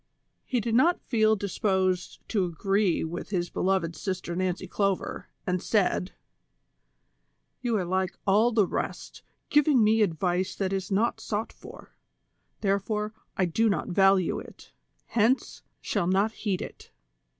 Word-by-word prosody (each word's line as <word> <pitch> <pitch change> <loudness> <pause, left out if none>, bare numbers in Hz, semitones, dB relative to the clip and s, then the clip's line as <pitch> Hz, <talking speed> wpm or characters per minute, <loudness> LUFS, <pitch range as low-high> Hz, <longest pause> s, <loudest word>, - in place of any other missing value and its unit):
He 250 - +1
did 230 0 -2
not 325 +9 +4
feel 220 -2 +3
disposed 190 -2 -1
to 200 -4 +1
agree 195 +2 +1
with 165 +2 -5
his 175 -3 -2
beloved 185 -3 0
Sister 180 +1 -4
Nancy 185 0 -1
Clover, 195 +1 -2 0.2
and 180 -1 0
said: 195 -3 +1 0.7
" - - -48
You 235 -3 +1
are 185 - -1
like 185 +1 -1
all 210 +5 +4
the 215 -3 +3
rest, - - -4 0.3
giving 295 -5 +5
me 220 +1 +4
advice 180 0 0
that 195 -1 -1
is 190 -1 -2
not 215 +5 +1
sought 215 +1 -3
for; - - -13 0.7
therefore, 210 +2 0 0.2
I 190 - +3
do 220 +6 +2
not 200 - -1
value 195 -1 +3
it; - - -13 0.3
hence, 235 +4 +1 0.2
shall 170 - -1
not 195 +4 +2
heed 200 -4 -2
it. - - -11
195 Hz, 140 wpm, -27 LUFS, 185-215 Hz, 0.7 s, giving